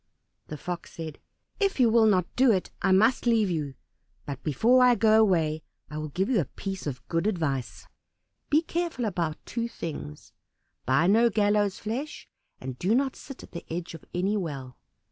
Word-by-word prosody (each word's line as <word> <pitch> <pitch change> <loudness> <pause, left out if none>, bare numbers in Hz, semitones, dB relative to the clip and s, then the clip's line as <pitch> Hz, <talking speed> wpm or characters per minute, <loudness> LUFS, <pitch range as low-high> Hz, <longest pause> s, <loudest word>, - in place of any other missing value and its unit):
The 150 - -6
Fox 175 +3 -6
said, 160 -3 -7 0.4
"If 395 -6 +1
you 250 - +6
will 225 -1 +5
not 185 -4 +3
do 255 -1 +5
it 190 -4 0
I 190 - +2
must 220 +6 +4
leave 220 -5 +3
you, 145 -5 -3 0.5
but 140 -1 -6
before 235 - +4
I 250 -1 +6
go 220 0 +5
away 160 -7 +2 0.3
I 150 - -4
will 155 0 -4
give 185 +7 -1
you 245 -5 +2
a - - -3
piece 195 +1 -6
of 125 -3 -6
good 165 +4 0
advice. 145 - -2 0.6
Be 310 +2 +4
careful 335 -7 -2
about 170 -6 -2
two 235 -1 -3
things. 145 - -7 0.5
Buy 135 +6 +3
no 225 +5 +5
gallows' 205 -2 +2
flesh, 255 +8 -5 0.3
and 130 -1 -7
do 200 +6 +2
not 270 +1 +1
sit 275 - -10
at - - -14
the 170 - -7
edge 170 +1 -4
of 165 - -10
any 190 +4 0
well." 140 - -4
190 Hz, 185 wpm, -27 LUFS, 155-230 Hz, 0.6 s, you